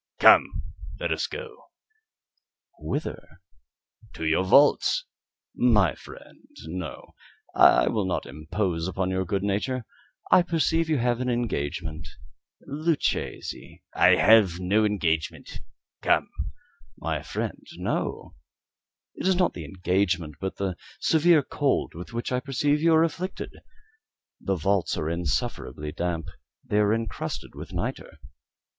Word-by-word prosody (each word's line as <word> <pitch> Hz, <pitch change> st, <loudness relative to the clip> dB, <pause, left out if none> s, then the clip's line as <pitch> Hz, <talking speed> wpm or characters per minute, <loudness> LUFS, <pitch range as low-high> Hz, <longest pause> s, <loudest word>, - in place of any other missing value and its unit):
"Come, -, -, +6 dB, 0.4 s
let -, -, -2 dB
us -, -, 0 dB
go." 475 Hz, 0 st, -9 dB, 1.1 s
"Whither?" 140 Hz, -, -5 dB, 0.7 s
"To 80 Hz, -, -5 dB
your 80 Hz, +3 st, +2 dB
vaults." 145 Hz, -, +4 dB, 0.5 s
"My 105 Hz, -, +3 dB
friend, -, -, -14 dB, 0.2 s
no; 85 Hz, -1 st, -7 dB, 0.4 s
I -, -, +6 dB
will 110 Hz, -4 st, 0 dB
not 95 Hz, -, -2 dB
impose 80 Hz, +5 st, -2 dB
upon 95 Hz, 0 st, -1 dB
your 95 Hz, 0 st, -1 dB
good 95 Hz, +2 st, -1 dB
nature. 105 Hz, +5 st, -1 dB, 0.5 s
I -, -, +8 dB
perceive 165 Hz, -1 st, +1 dB
you 155 Hz, -, +2 dB
have 120 Hz, 0 st, 0 dB
an 125 Hz, -, -1 dB
engagement. 80 Hz, -9 st, -2 dB, 0.6 s
Luchesi 155 Hz, +2 st, -2 dB
" -, -, -42 dB
"I -, -, +8 dB
have 105 Hz, -6 st, +5 dB
no 100 Hz, +4 st, +2 dB
engagement; 85 Hz, -7 st, -1 dB, 0.4 s
come." -, -, +2 dB, 0.7 s
"My -, -, -2 dB
friend, -, -, -4 dB
no. -, -, -3 dB, 0.8 s
It -, -, -3 dB
is 190 Hz, -, +4 dB
not 180 Hz, -1 st, +2 dB
the 80 Hz, -, -7 dB
engagement, 90 Hz, -2 st, -1 dB
but 95 Hz, 0 st, -3 dB
the 95 Hz, -3 st, -3 dB, 0.2 s
severe 160 Hz, -1 st, +4 dB
cold 140 Hz, 0 st, 0 dB
with 85 Hz, +2 st, -9 dB
which 120 Hz, +1 st, -4 dB
I 125 Hz, -, +1 dB
perceive 145 Hz, +2 st, 0 dB
you 165 Hz, 0 st, +5 dB
are 160 Hz, -, +5 dB
afflicted. 170 Hz, +3 st, -3 dB, 0.9 s
The 95 Hz, -, -1 dB
vaults 95 Hz, +2 st, 0 dB
are 80 Hz, +1 st, -1 dB
insufferably 75 Hz, -2 st, -2 dB
damp. 85 Hz, 0 st, -2 dB, 0.4 s
They 105 Hz, -, +1 dB
are 105 Hz, 0 st, +3 dB
encrusted 115 Hz, -2 st, -3 dB
with -, -, -9 dB
nitre." -, -, -4 dB
100 Hz, 125 wpm, -26 LUFS, 85-140 Hz, 1.1 s, I